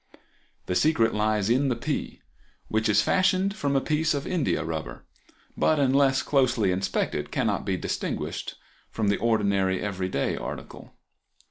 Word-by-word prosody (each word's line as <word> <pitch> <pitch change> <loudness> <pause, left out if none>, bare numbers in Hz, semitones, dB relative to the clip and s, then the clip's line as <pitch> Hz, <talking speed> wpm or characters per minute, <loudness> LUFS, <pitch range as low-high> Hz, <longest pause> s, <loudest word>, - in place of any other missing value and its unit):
The - - -2
secret 115 - +2
lies 105 -1 +1
in 130 +4 +2
the 125 - 0
pea, 115 - -4 0.5
which 110 0 +1
is 105 0 +4
fashioned 190 +1 +2
from 140 -8 -1
a - - +5
piece 155 +1 +1
of 140 - -3
india 160 - 0
rubber, 80 -6 -5 0.5
but 155 -1 +2
unless 135 -1 +3
closely 125 -8 +2
inspected 95 +2 -1
cannot - - -1
be - - 0
distinguished - - -4 0.3
from 110 -3 -1
the 100 - +2
ordinary 100 -5 +1
everyday 95 -7 -2
article. - - -8
115 Hz, 140 wpm, -26 LUFS, 100-140 Hz, 0.5 s, a